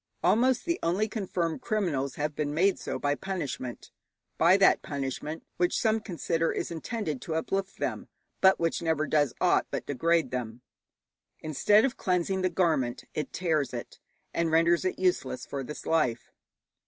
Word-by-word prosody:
Almost 250 Hz, +2 st, +3 dB
the 340 Hz, 0 st, 0 dB
only 185 Hz, +6 st, +1 dB
confirmed 185 Hz, -7 st, -2 dB
criminals 170 Hz, -, -1 dB
have 150 Hz, +1 st, -2 dB
been 145 Hz, 0 st, -2 dB
made 190 Hz, +4 st, +3 dB
so -, -, -4 dB
by 145 Hz, 0 st, 0 dB
punishment, 145 Hz, -8 st, -5 dB, 0.4 s
by 175 Hz, +4 st, +5 dB
that 195 Hz, -1 st, +5 dB
punishment 140 Hz, +3 st, -4 dB
which 175 Hz, 0 st, +2 dB
some 220 Hz, -1 st, +2 dB
consider 165 Hz, -5 st, -1 dB
is -, -, -3 dB
intended 165 Hz, -, -3 dB
to 160 Hz, -, -4 dB
uplift 195 Hz, +4 st, -2 dB
them, -, -, -3 dB, 0.3 s
but 190 Hz, 0 st, +6 dB
which 165 Hz, -1 st, 0 dB
never 160 Hz, -2 st, +1 dB
does 145 Hz, -4 st, +1 dB
aught -, -, +3 dB
but -, -, -4 dB
degrade 165 Hz, +4 st, +1 dB
them. 120 Hz, -2 st, -4 dB, 0.8 s
Instead 205 Hz, -, +4 dB
of 270 Hz, -1 st, -2 dB
cleansing 185 Hz, +1 st, 0 dB
the 185 Hz, -, +2 dB
garment, 160 Hz, -9 st, 0 dB
it 150 Hz, -, -3 dB
tears 155 Hz, -7 st, 0 dB
it, 120 Hz, -, -7 dB, 0.3 s
and 170 Hz, -1 st, +1 dB
renders 165 Hz, +2 st, +3 dB
it 185 Hz, -, -1 dB
useless 155 Hz, -9 st, 0 dB
for 140 Hz, -1 st, -4 dB
this 150 Hz, +4 st, -8 dB
life. 125 Hz, -8 st, 0 dB
165 Hz, 160 wpm, -28 LUFS, 145-190 Hz, 0.8 s, but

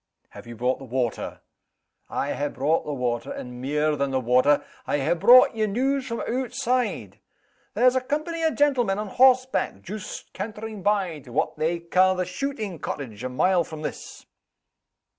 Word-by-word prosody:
"Have -, -, -12 dB
you 120 Hz, -, -8 dB
brought 125 Hz, +3 st, 0 dB
the -, -, -10 dB
water?" 125 Hz, -2 st, -3 dB, 0.7 s
"I -, -, -2 dB
ha' 145 Hz, 0 st, -2 dB
brought 145 Hz, +6 st, 0 dB
the -, -, -2 dB
water 120 Hz, -3 st, -2 dB
and 125 Hz, 0 st, -7 dB
mair 150 Hz, +3 st, +1 dB
than 140 Hz, -1 st, -1 dB
the 135 Hz, -1 st, 0 dB
water. 130 Hz, +4 st, +3 dB, 0.2 s
I -, -, +1 dB
ha' 140 Hz, +4 st, +1 dB
brought 245 Hz, +9 st, +7 dB
ye 215 Hz, -1 st, +1 dB
news 265 Hz, +5 st, 0 dB
from 230 Hz, -1 st, -3 dB
ootside. 245 Hz, -, -2 dB, 0.6 s
There's 250 Hz, +4 st, +4 dB
a 260 Hz, -, +2 dB
company 310 Hz, +5 st, -3 dB
o' 320 Hz, -, +4 dB
gentlemen 265 Hz, -10 st, +2 dB
on 210 Hz, -1 st, -4 dB
horseback, 255 Hz, -, +3 dB
joost 210 Hz, +1 st, -8 dB
cantering 215 Hz, +1 st, -6 dB
by 190 Hz, -5 st, 0 dB
to 130 Hz, -3 st, -14 dB
what -, -, 0 dB
they 160 Hz, +3 st, 0 dB
ca' 185 Hz, +2 st, +3 dB
the 185 Hz, 0 st, -1 dB
shootin' 205 Hz, -, -4 dB
cottage, 120 Hz, -6 st, -6 dB
a 130 Hz, -, -2 dB
mile 175 Hz, +7 st, +2 dB
from 155 Hz, -1 st, -9 dB
this." -, -, -7 dB
185 Hz, 170 wpm, -25 LUFS, -, 0.7 s, brought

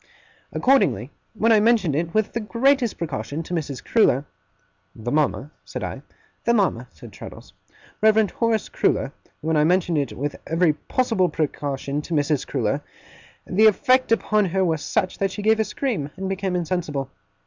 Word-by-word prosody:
Accordingly, 150 Hz, -, +2 dB, 0.2 s
when 225 Hz, +2 st, +2 dB
I 220 Hz, -, +6 dB
mentioned 210 Hz, -9 st, +3 dB
it, 165 Hz, +2 st, -1 dB
with 215 Hz, +2 st, 0 dB
the 235 Hz, -, -1 dB
greatest 240 Hz, +2 st, +1 dB
precaution, 145 Hz, -1 st, -4 dB
to 175 Hz, -, -7 dB
Mrs. 145 Hz, -5 st, -3 dB
Crewler 150 Hz, -, +3 dB, 0.4 s
' -, -, -43 dB
'The 120 Hz, +2 st, -5 dB
mama?' 150 Hz, -1 st, 0 dB
said -, -, -6 dB
I. -, -, -5 dB, 0.4 s
'The 235 Hz, -, +3 dB
mama,' 170 Hz, -, +1 dB
said 80 Hz, -5 st, -13 dB
Traddles -, -, -11 dB, 0.5 s
'Reverend 220 Hz, -1 st, +4 dB
Horace 230 Hz, -2 st, 0 dB
Crewler 135 Hz, -, 0 dB, 0.3 s
when 160 Hz, +1 st, 0 dB
I 150 Hz, -, +4 dB
mentioned 175 Hz, -1 st, +2 dB
it 140 Hz, -, -2 dB
with 145 Hz, +2 st, -3 dB
every 165 Hz, -1 st, +3 dB
possible 195 Hz, +2 st, 0 dB
precaution 145 Hz, -2 st, -2 dB
to 165 Hz, +2 st, -4 dB
Mrs. 145 Hz, -1 st, 0 dB
Crewler, 135 Hz, +2 st, -1 dB, 0.6 s
the 215 Hz, +4 st, +4 dB
effect 255 Hz, +3 st, +3 dB
upon 215 Hz, -2 st, +2 dB
her 190 Hz, +1 st, +1 dB
was 160 Hz, -3 st, 0 dB
such 185 Hz, -, -1 dB
that 195 Hz, -, +1 dB
she 205 Hz, +2 st, -6 dB
gave 220 Hz, +1 st, +3 dB
a -, -, +4 dB
scream 210 Hz, -, -3 dB
and 190 Hz, 0 st, -3 dB
became 190 Hz, -1 st, -2 dB
insensible. 165 Hz, -6 st, -2 dB
180 Hz, 170 wpm, -23 LUFS, 145-220 Hz, 0.6 s, I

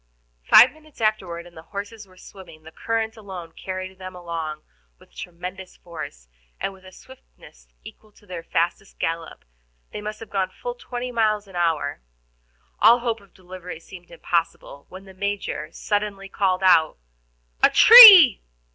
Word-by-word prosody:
Five 245 Hz, -, +6 dB
minutes 310 Hz, 0 st, -21 dB
afterward, 190 Hz, -6 st, -2 dB
and 175 Hz, -, -17 dB
the 160 Hz, -, -11 dB
horses 205 Hz, +4 st, -9 dB
were 185 Hz, -1 st, -22 dB
swimming; 180 Hz, -5 st, -15 dB
the 160 Hz, -, -14 dB
current 225 Hz, +4 st, -4 dB
alone 185 Hz, -6 st, -10 dB
carried 185 Hz, +2 st, -8 dB
them 185 Hz, 0 st, -10 dB
along 165 Hz, -3 st, -7 dB, 0.3 s
with -, -, -24 dB
tremendous 180 Hz, +1 st, -10 dB
force, 110 Hz, -, -11 dB, 0.3 s
and 195 Hz, -, -4 dB
with 190 Hz, -1 st, -20 dB
a 185 Hz, -, -14 dB
swiftness 180 Hz, -, -19 dB, 0.2 s
equal 215 Hz, -, -15 dB
to 205 Hz, -, -24 dB
their 180 Hz, -4 st, -8 dB
fastest 170 Hz, +4 st, -3 dB
gallop; 165 Hz, 0 st, -5 dB, 0.5 s
they -, -, -7 dB
must 215 Hz, +1 st, -7 dB
have 225 Hz, -, -12 dB
gone 190 Hz, -2 st, -2 dB
fully 245 Hz, +5 st, -9 dB
twenty 250 Hz, +1 st, -7 dB
miles 215 Hz, -3 st, -1 dB
an 190 Hz, -, -16 dB
hour. 160 Hz, -, -2 dB, 0.8 s
All 230 Hz, +3 st, +6 dB
hope 230 Hz, -2 st, -3 dB
of 200 Hz, -2 st, -24 dB
delivery 180 Hz, -2 st, -11 dB
seemed 175 Hz, +1 st, -15 dB
impossible, 165 Hz, -4 st, -4 dB
when 190 Hz, +1 st, -13 dB
the 190 Hz, -, -15 dB
Major 195 Hz, -5 st, -5 dB
suddenly 205 Hz, 0 st, -4 dB
called 190 Hz, -1 st, -2 dB
out: 165 Hz, -4 st, +3 dB, 0.6 s
"A -, -, +5 dB
tree!" 405 Hz, -, +9 dB
190 Hz, 155 wpm, -22 LUFS, 170-215 Hz, 0.8 s, tree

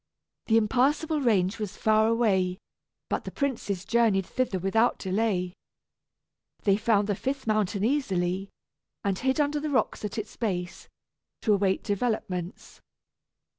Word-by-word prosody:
The 225 Hz, -, +4 dB
Impassable 280 Hz, +8 st, +2 dB
Range 205 Hz, -4 st, +2 dB
was 210 Hz, -3 st, -5 dB
far 220 Hz, 0 st, +3 dB
away, 195 Hz, -6 st, +2 dB, 0.5 s
but -, -, -2 dB
the -, -, -5 dB
princes 215 Hz, -9 st, -2 dB
journeyed 220 Hz, -5 st, +2 dB
thither 255 Hz, -5 st, -1 dB
without 210 Hz, +6 st, +2 dB
delay. 190 Hz, -2 st, -1 dB, 1.1 s
They 200 Hz, -2 st, +4 dB
found 210 Hz, -1 st, +2 dB
the 205 Hz, -, +1 dB
fifth 270 Hz, +6 st, -3 dB
mountain 215 Hz, -2 st, 0 dB
easily, 195 Hz, -8 st, 0 dB, 0.5 s
and 195 Hz, -2 st, 0 dB
hid 265 Hz, +3 st, 0 dB
under 295 Hz, 0 st, +1 dB
the 305 Hz, +1 st, -3 dB
rocks 260 Hz, -5 st, 0 dB
at 210 Hz, +2 st, -4 dB
its 215 Hz, -1 st, -5 dB
base, 180 Hz, -6 st, -3 dB, 0.6 s
to 215 Hz, -, +4 dB
await 195 Hz, -1 st, +1 dB
developments. 200 Hz, -4 st, -3 dB
215 Hz, 130 wpm, -27 LUFS, 190-240 Hz, 1.1 s, The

